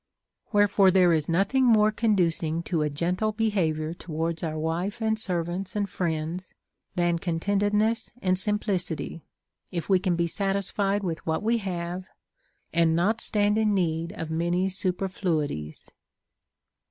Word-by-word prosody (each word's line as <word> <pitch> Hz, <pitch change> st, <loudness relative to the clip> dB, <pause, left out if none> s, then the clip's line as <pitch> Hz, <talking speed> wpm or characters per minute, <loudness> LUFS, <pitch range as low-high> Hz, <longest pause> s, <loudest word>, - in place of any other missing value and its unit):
AVherefore 205 Hz, -2 st, +5 dB
there 180 Hz, -2 st, +5 dB
is 155 Hz, -1 st, +1 dB
nothing 200 Hz, +10 st, +2 dB
more 215 Hz, -3 st, +5 dB
conducing 170 Hz, -7 st, +1 dB
to 165 Hz, -2 st, -1 dB
a 150 Hz, -, +1 dB
gentle 180 Hz, +8 st, 0 dB
behavior 170 Hz, -8 st, 0 dB
towards 165 Hz, -1 st, -3 dB
our 155 Hz, -2 st, -3 dB
wife 170 Hz, +8 st, -2 dB
and 220 Hz, -1 st, 0 dB
servants 180 Hz, 0 st, -3 dB
and 205 Hz, -1 st, 0 dB
friends 170 Hz, 0 st, -3 dB, 0.4 s
than 175 Hz, -1 st, +1 dB
contentedness 205 Hz, +6 st, +1 dB
and 185 Hz, -3 st, +2 dB
sim 210 Hz, +3 st, +1 dB
plicity, 180 Hz, -6 st, -3 dB, 0.5 s
if 170 Hz, +1 st, -3 dB
Ave 190 Hz, -, +6 dB
can 180 Hz, -2 st, 0 dB
be 170 Hz, 0 st, +1 dB
satisfied 200 Hz, +2 st, 0 dB
with 165 Hz, -3 st, -3 dB
what 160 Hz, +4 st, 0 dB
we 230 Hz, +2 st, +2 dB
have, 180 Hz, -1 st, -4 dB, 0.7 s
and 165 Hz, -1 st, +3 dB
not 205 Hz, +7 st, +1 dB
stand 210 Hz, 0 st, +2 dB
in 215 Hz, -2 st, +2 dB
need 165 Hz, -2 st, 0 dB
of 165 Hz, -6 st, -5 dB
many 175 Hz, +3 st, +1 dB
superfluities. 180 Hz, -, -2 dB
180 Hz, 140 wpm, -26 LUFS, 165-205 Hz, 0.7 s, Ave